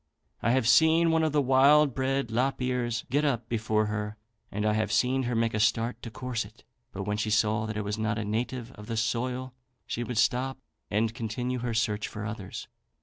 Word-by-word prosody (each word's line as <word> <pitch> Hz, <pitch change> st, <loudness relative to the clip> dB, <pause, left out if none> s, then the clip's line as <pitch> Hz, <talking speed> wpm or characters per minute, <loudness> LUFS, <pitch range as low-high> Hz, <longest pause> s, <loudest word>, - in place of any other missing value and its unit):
I 115 Hz, -, +1 dB
have 130 Hz, -3 st, +2 dB
seen 160 Hz, +4 st, +5 dB
one 160 Hz, 0 st, +3 dB
of 160 Hz, -1 st, +1 dB
the 145 Hz, -1 st, +2 dB
wild 135 Hz, +2 st, +5 dB
bred 135 Hz, 0 st, 0 dB
lop 125 Hz, +4 st, 0 dB
ears 125 Hz, -3 st, -1 dB
get 145 Hz, +3 st, +2 dB
up 120 Hz, -6 st, 0 dB
before 110 Hz, -2 st, +1 dB
her, 105 Hz, 0 st, -3 dB, 0.3 s
and 105 Hz, +1 st, -2 dB
I 105 Hz, -, +3 dB
have 110 Hz, -1 st, 0 dB
seen 125 Hz, +4 st, +2 dB
her 120 Hz, -, -1 dB
make 115 Hz, 0 st, +1 dB
a 105 Hz, -, 0 dB
start 115 Hz, +2 st, +1 dB
to 115 Hz, -, -6 dB
course 120 Hz, +1 st, -3 dB
it; 110 Hz, +3 st, -16 dB, 0.3 s
but 95 Hz, -, -5 dB
when 105 Hz, +1 st, -2 dB
she 110 Hz, 0 st, -1 dB
saw 110 Hz, 0 st, +2 dB
that 110 Hz, -1 st, -4 dB
it 105 Hz, -, -1 dB
was 105 Hz, +1 st, -3 dB
not 110 Hz, 0 st, 0 dB
a 110 Hz, -, -2 dB
native 120 Hz, +3 st, -3 dB
of 105 Hz, -4 st, -12 dB
the 115 Hz, -1 st, -3 dB
soil 125 Hz, +3 st, -1 dB, 0.3 s
she 120 Hz, -, -3 dB
would 120 Hz, -1 st, -4 dB
stop 130 Hz, +3 st, +1 dB, 0.3 s
and 110 Hz, +2 st, +1 dB
continue 125 Hz, +2 st, -3 dB
her 120 Hz, -1 st, -2 dB
search 105 Hz, -1 st, 0 dB
for 105 Hz, 0 st, -6 dB
others. 105 Hz, -3 st, -6 dB
115 Hz, 215 wpm, -28 LUFS, 110-130 Hz, 0.3 s, seen